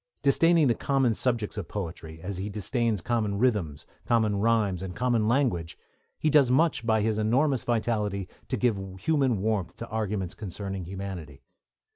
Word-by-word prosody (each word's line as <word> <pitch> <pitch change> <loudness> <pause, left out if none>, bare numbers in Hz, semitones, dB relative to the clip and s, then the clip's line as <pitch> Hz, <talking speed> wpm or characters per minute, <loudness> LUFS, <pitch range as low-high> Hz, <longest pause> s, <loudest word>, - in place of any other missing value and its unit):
Disdaining 165 +3 +4
the 120 - +4
common 135 -2 +1
subjects 115 -2 -1
of 100 - -4
poetry, 80 -4 -6
as 95 0 -4
he 100 +2 -3
disdains 110 0 -1
common 105 -1 0
rhythms, 100 - 0 0.2
common 110 -3 +2
rhymes, 105 -4 +1
and 95 -2 -6
common 120 -2 +1
language, 115 - 0 0.4
he - - -1
does 145 -4 +5
much 150 0 +3
by 110 -2 +2
his 110 0 0
enormous 130 +5 +2
vitality 105 -5 -1 0.2
to - - -1
give 115 -5 +1 0.2
human 130 -4 +1
warmth 105 -5 -1
to 115 - -7
arguments 105 -4 -2
concerning 95 -2 -5
humanity. 90 -6 -7
110 Hz, 155 wpm, -27 LUFS, 95-120 Hz, 0.4 s, does